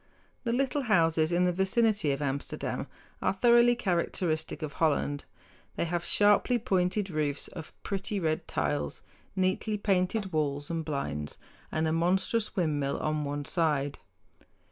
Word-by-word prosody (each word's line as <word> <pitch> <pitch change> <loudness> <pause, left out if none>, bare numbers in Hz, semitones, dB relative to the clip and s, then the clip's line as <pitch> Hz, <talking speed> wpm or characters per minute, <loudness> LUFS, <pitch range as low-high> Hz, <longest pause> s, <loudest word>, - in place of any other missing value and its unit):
The 230 - +1
little 270 +3 +1
houses 165 -8 +3
in 175 +1 +3
the 180 - +3
vicinity 195 -2 +2
of 140 +1 -2
Amsterdam 140 0 -3 0.3
are - - +2
thoroughly 240 +3 +5
characteristic 175 -7 -1
of 150 -2 -4
Holland. 145 -2 +1 0.5
They - - 0
have 170 0 -2
sharply 205 +4 +4
pointed 195 -3 0
roofs 150 -2 0
of 160 -3 -9
pretty 200 +1 -2
red 160 -1 -1
tiles, 145 - -2 0.3
neatly 190 +3 0
painted 195 0 0
walls 145 -1 -1
and 165 -1 -2
blinds, 75 - -3 0.3
and 160 0 0
a - - +1
monstrous 190 +6 +1
windmill 150 -7 0
on 155 -1 -1
one 145 0 -3
side. 145 -5 0
170 Hz, 140 wpm, -29 LUFS, 150-200 Hz, 0.5 s, thoroughly